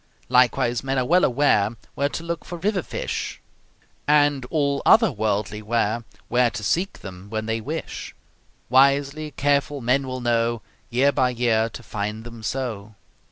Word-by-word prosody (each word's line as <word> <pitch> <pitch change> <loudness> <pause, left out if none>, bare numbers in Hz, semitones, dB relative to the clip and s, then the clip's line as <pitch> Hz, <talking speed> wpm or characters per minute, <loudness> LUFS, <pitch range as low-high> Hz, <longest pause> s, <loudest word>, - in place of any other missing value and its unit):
Likewise, 120 -1 +3
men 135 0 -1
are 130 - +1
well 180 +6 +4
aware 120 -5 +2 0.2
Where 140 +1 0
to 165 - -5
look 170 0 -4
for 175 - -7
river 195 +2 0
fish; - - -4 0.7
And 145 -3 +3
all 140 -2 0
other 225 -5 +6
worldly 105 -2 -2
ware 115 +1 0 0.2
Where 120 0 +3
to 105 -1 -6
seek 180 - -1
them 95 0 -10
when 110 0 -3
they 110 0 -2
wish; - - -6 0.5
Wisely 140 +3 +3
careful 145 +1 0
men 130 +2 +1
will 130 0 -4
know 120 -1 0 0.3
Year 130 +4 +3
by 130 -2 +2
year 115 -2 +1
to 120 - -10
find 105 +1 -4
them 115 -1 -10
so. 110 -3 -4
125 Hz, 160 wpm, -23 LUFS, 110-140 Hz, 0.7 s, other